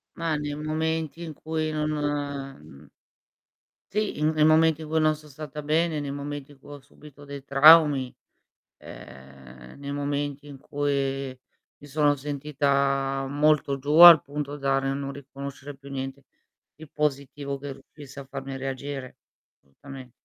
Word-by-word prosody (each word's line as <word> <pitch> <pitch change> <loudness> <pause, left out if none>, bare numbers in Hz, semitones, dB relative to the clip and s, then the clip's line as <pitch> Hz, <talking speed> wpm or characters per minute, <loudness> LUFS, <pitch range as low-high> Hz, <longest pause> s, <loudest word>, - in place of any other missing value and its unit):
Mah, 165 -2 -1
nei 145 0 -4
momenti 160 +1 -3
in 160 -2 -7
cui 155 +1 -3
non, 155 0 -1
mhmm 140 - -5 1.1
Sì, 210 +1 -1
in 155 +1 +2
nei 155 -1 +2
momenti 160 0 +4
in 155 - -7
cui 160 +1 +1
non 155 0 +3
son 150 0 -16
stata 150 +1 -8
bene, 155 +1 0
nei 145 -1 -4
momenti 145 0 -6
in 145 - -17
cui 145 - -14
ho 145 - -9
subito 145 +1 -16
dei 140 -1 -9
traumi, 140 -2 +6 0.6
ehm, 65 -2 -13
nei 140 0 -6
momenti 145 0 -3
in 140 -1 -10
cui 135 -2 -2 0.4
mi 145 - -14
sono 145 0 +2
sentita 140 -1 -1
molto 145 -1 +2
giù, 145 +2 -4
al 170 -2 +11
punto 145 0 -5
da 135 -1 +1
ri 135 0 -2
non 140 0 -3
riconoscere 140 0 -9
più 140 +1 -13
niente 135 0 -5 0.5
di 160 +1 -12
positivo 140 -1 -3
che 140 0 -6
riuscisse 140 +1 -13
a 140 - -9
farmi 135 0 -7
reagire. 135 0 -6 0.4
Assolutamente. 130 - -12
145 Hz, 150 wpm, -26 LUFS, 135-150 Hz, 1.1 s, al